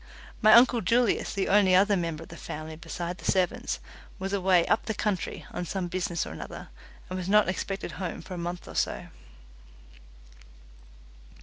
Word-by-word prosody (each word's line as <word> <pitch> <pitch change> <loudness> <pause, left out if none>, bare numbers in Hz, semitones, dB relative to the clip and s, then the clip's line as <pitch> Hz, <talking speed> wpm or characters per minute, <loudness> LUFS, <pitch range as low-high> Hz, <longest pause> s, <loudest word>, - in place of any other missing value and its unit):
My 215 -1 +7
uncle 240 0 +6
Julius, 235 +3 +2
the 195 -1 -1
only 190 -2 +5
other 200 +2 +5
member 165 -3 -2
of - - -15
the 170 - -9
family 155 -1 -7
besides 175 +2 -6
the - - +2
servants, 185 -2 0 0.4
was 195 +1 -4
away 185 -3 +4
"up 220 - +1
the 220 - -1
country" 205 -3 -2
on - - -4
some 180 0 -3
business 175 -1 -2
or - - -7
another, - - -8 0.4
and 185 0 -4
was 185 0 -4
not 210 -1 +5
expected 195 +2 -3
home 180 -3 -5
for 185 - -8
a - - -5
month 175 +1 -5
or - - -9
so. - - -1
185 Hz, 175 wpm, -28 LUFS, 175-205 Hz, 0.4 s, My